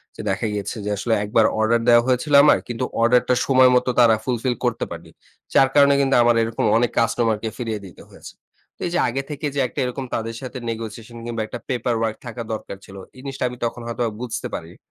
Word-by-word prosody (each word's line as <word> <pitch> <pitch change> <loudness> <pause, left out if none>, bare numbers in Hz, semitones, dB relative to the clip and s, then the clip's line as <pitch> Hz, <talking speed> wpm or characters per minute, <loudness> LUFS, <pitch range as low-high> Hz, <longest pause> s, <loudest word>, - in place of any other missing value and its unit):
যে - - -7
দেখা - - -1
গিয়েছে 105 +3 -4
যে, - - -2
আসলে 115 +2 0
একবার 110 +1 +3
অর্ডার 115 +1 +2
দেয়া 120 0 +7
হয়েছিল 130 +4 0
আমার 150 - +6
কিন্তু 120 +1 -3 0.2
অর্ডারটা 125 +1 +3
সময় 130 -1 +5
মতো 125 - +2
তারা 115 -2 +6
ফুলফিল 125 0 -1
করতে 120 - 0
পারেনি। 85 -1 -9 0.4
যার 135 -1 +5
কারণে 140 0 +6
কিন্তু 135 0 +2
আমার 120 0 +4
এরকম 115 0 -2
অনেক 120 0 +1
কাস্টমারকে 115 -1 0
ফিরিয়ে 115 -4 -3
দিতে 90 - -13
হয়েছে। - - -13 0.4
তো - - -45
এই - - -5
যে - - +1
আগে 135 +3 -2
থেকে 150 0 -5
যে - - 0
একটা - - -7
এরকম 130 +1 -4
তাদের 115 0 -4
সাথে 130 0 -7
নেগোশিয়েশন 115 +1 -7
কিংবা 115 -2 -3
একটা 120 - -7
পেপার 120 -2 -1
ওয়ার্ক 110 -1 -1
থাকা 120 0 -6
দরকার 100 -2 -6
ছিল। 95 - -13 0.2
এই 130 - -12
জিনিসটা 135 -2 -5
আমি 125 - -9
তখন 120 +1 -4
হয়তোবা 115 -1 -2
বুঝতে 120 -2 -4
পারি 80 - -5
নি। - - -17
120 Hz, 215 wpm, -22 LUFS, 115-125 Hz, 0.4 s, দেয়া